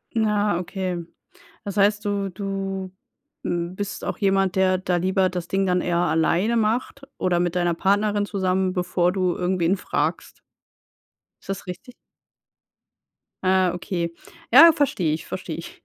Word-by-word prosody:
Ah, 210 -4 +1
okay. 180 -1 -4 0.6
Das 200 -1 -5
heißt, 205 +1 +3
du 200 -1 -1
du 195 -1 -4 0.5
m 175 +1 -2
bist 205 0 -5
auch - - -3
jemand, 195 -2 +1
der 185 -1 +3
da 180 -1 -1
lieber 185 +1 +2
das 180 -2 -5
Ding 195 0 +1
dann 180 0 +2
eher 175 -1 0
alleine 175 +7 +2
macht 230 +5 -1 0.2
oder 175 -1 +1
mit 175 0 0
deiner 175 -1 +1
Partnerin 205 +3 +1
zusammen, 190 -2 0
bevor 180 -1 +1
du 185 -2 0
irgendwen 180 0 +1
fragst. - - -3 1.0
Ist - - -19
das 195 -1 -4
richtig? 185 +8 -8 1.5
Ah, 185 -1 +3
okay. 170 -2 -3 0.4
Ja, 335 0 +10
verstehe 240 - 0
ich, 155 - -5
verstehe - - -5
ich. - - -10
190 Hz, 145 wpm, -23 LUFS, 180-200 Hz, 1.5 s, Ja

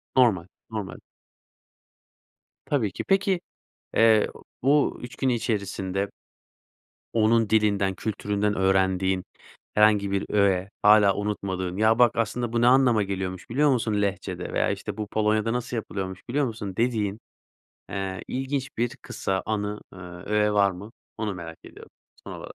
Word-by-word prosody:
Normal, 110 -10 +4 0.2
normal. 105 -4 -5 1.7
Tabii 120 -9 0
ki. - - -5
Peki, 195 -2 +2 0.6
eee, 110 -1 +5 0.4
bu 145 +2 +3
3 120 -1 -8
gün 130 - 0
içerisinde 100 -4 -1 1.0
onun 115 0 +3
dilinden, 100 -3 +2
kültüründen 105 -1 -1
öğrendiğin 95 -1 +2 0.5
herhangi 105 -2 +4
bir 100 0 0
öğe 100 -2 +2
hâlâ 105 -1 +6
unutmadığın, 95 -3 -3
"Ya 110 +2 +3
bak 120 -2 +6
aslında 115 +1 -1
bu 115 - +2
ne 120 - +5
anlama 125 -4 +5
geliyormuş 95 -2 -4
biliyor 145 +5 +3
musun 110 -4 +1
lehçede 100 -2 -3
veya - - +2
işte - - -5
bu 105 -1 -3
Polonya'da 110 +1 +1
nasıl 125 0 -3
yapılıyormuş 95 -4 -5
biliyor 140 +2 +1
musun?" 105 -5 -5
dediğin, 110 -4 0 0.7
eee, 95 -1 -4
ilginç 135 +1 -2
bir 120 +1 -1
kısa 95 -1 -3
anı, 105 -1 -2
eee, 90 - -11 0.3
öğe 105 0 +2
var 100 -1 +4
mı 100 +5 -10 0.3
onu 105 -3 -2
merak 80 -2 -8
ediyorum - - -13 0.3
son - - -7
olarak. - - -8
105 Hz, 140 wpm, -25 LUFS, 95-115 Hz, 1.7 s, hâlâ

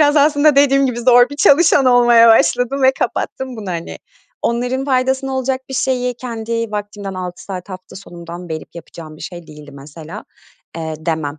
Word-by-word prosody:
biraz 295 0 +4
aslında 290 0 +4
dediğim 275 -1 +4
gibi 240 -2 -3
zor 245 0 +5
bir 285 - -8
çalışan 290 -2 +4
olmaya 240 -2 +5
başladım 245 +4 +2
ve 260 0 +5
kapattım 260 -2 -3
bunu 205 -4 -6
hani. 170 -1 -6 0.4
Onların 250 +3 -1
faydasına 265 0 0
olacak 260 0 -2
bir 265 - -6
şeyi 250 -1 -1
kendi 230 -2 -4
vaktimden 205 -2 -6
6 180 -1 -7
saat 190 0 -7
hafta 185 0 -10
sonundan 175 -2 -10
verip 160 +1 -7
yapacağım 160 -2 -11
bir - - -13
şey 175 -3 -9
değildi 150 -1 -13
mesela 150 +4 -11 0.5
Eee, 160 -1 -5
demem. 155 -2 -3
230 Hz, 170 wpm, -17 LUFS, 175-260 Hz, 0.5 s, zor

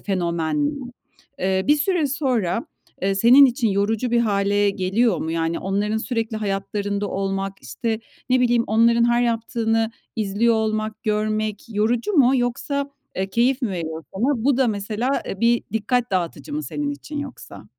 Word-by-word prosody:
fenomen. 185 - -1 0.6
Eee, 190 0 0
bir 295 - +5
süre 325 +1 +1
sonra, 255 - -1 0.4
eee, 195 +1 +1
senin 245 +8 +7
için 245 -2 0
yorucu 210 +4 0
bir 240 0 +3
hâle 205 -2 +2
geliyor 195 +2 +1
mu? 160 - -3
Yani, 165 0 -1
onların 205 +3 -1
sürekli 225 -1 -2
hayatlarında 205 0 -2
olmak, 195 0 -2
işte, 220 - -3 0.3
ne 255 0 +4
bileyim, 240 -1 +3
onların 230 +2 +4
her 240 0 +3
yaptığını 225 -1 0 0.3
izliyor 220 +2 +2
olmak, 215 0 -2
görmek 215 -1 -1
yorucu 230 - 0
mu 270 -8 +5
yoksa, 275 +3 -1 0.3
eee, 190 +1 -2
keyif 250 +6 +2
mi 235 - 0
veriyor 160 -3 -4
sana? 240 +3 0
Bu 275 -2 +3
da, 260 -2 +3
mesela, 215 +5 -1 0.2
bir 235 0 +3
dikkat 230 +3 0
dağıtıcı 185 - -2
mı 305 - -2
senin 295 -1 -3
için 290 +1 -6
yoksa? 285 -3 -8
220 Hz, 150 wpm, -22 LUFS, 200-245 Hz, 0.6 s, senin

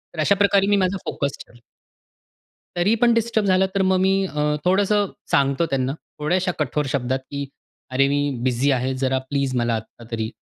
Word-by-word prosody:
तर - - -7
अशा 200 +6 +3
प्रकारे 200 0 +3
मी 205 - +4
माझा 190 0 +1
फोकस 140 -1 -3
ठेवला. 120 - -20 1.2
तरी 180 +6 +3
पण 240 -1 +6
डिस्टर्ब 230 -2 +1
झालं 190 0 +3
तर 195 - +2
मग 190 0 +2
मी 190 +1 +3
अ, 150 -5 -4 0.2
थोडंसं 200 +3 +2 0.2
सांगतो 140 +4 +2
त्यांना, 135 -3 -1 0.3
थोड्याशा 180 +5 0
कठोर 150 0 -1
शब्दात 130 -1 0
की 140 0 -4 0.4
"अरे, 135 +2 +2
मी 145 +1 +1 0.2
बिझी 130 +2 +1
आहे 130 0 0
जरा 130 0 +1
प्लीज 140 -2 -1
मला 120 -1 +1
आता 110 +1 -7
तरी 110 -1 -3
150 Hz, 180 wpm, -22 LUFS, 130-190 Hz, 1.2 s, पण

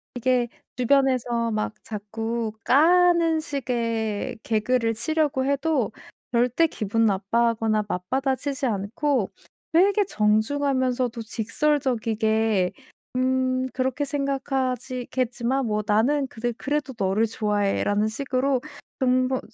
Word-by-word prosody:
이게 245 0 +1 0.3
주변에서 250 -3 +2
막 215 0 -1
자꾸 225 +2 -4
까는 335 +3 +4
식의 230 -8 -2
개그를 225 +1 0
치려고 285 +1 0
해도 280 -4 0 0.4
절대 245 +6 +3
기분 225 -6 0
나빠하거나 220 +2 +1
맞받아치지 265 +8 -1
않고 230 +3 0 0.4
되게 395 +5 +4
정중하면서도 250 - +1
직설적이게 225 -5 +1 0.5
'음 255 0 +1
그렇게 260 +2 -1
생각하지 265 -3 -2
겠지만 255 +1 -1
뭐 210 -1 -1
나는 250 +7 +2
그래 240 -1 -3
그래도 285 -1 -2
너를 195 +4 +1
좋아해' 210 -2 0
라는 205 +1 +1
식으로 260 +2 0 0.4
근본 255 0 +2
250 Hz, 250 characters per minute, -24 LUFS, 220-270 Hz, 0.5 s, 까는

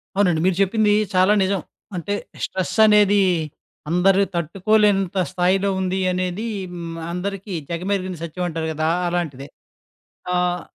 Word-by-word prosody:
అవునండి. 180 -5 +2
మీరు 185 -2 +2
చెప్పింది 210 +2 +3 0.2
చాలా 185 +3 +5
నిజం. 190 -1 0 0.3
అంటే 180 +4 -3 0.3
స్ట్రెస్సనేది 205 +1 +3 0.7
అందరు 190 +3 +4
తట్టుకోలేనంత 195 +3 +1
స్థాయిలో 185 +2 +1
ఉంది 190 +1 -1
అనేది 185 +4 -2 0.3
హ్మ్. 170 -1 -6
అందరికీ 195 +2 -4 0.2
జగమెరిగిన 185 +2 -2
సత్యం 170 +2 -4
అంటారు 160 -1 -3
కదా! 155 +1 -1 0.2
అలాంటిదే. 160 -6 -3 0.9
ఆహ్, 180 0 0
185 Hz, 110 wpm, -21 LUFS, 175-200 Hz, 0.9 s, చాలా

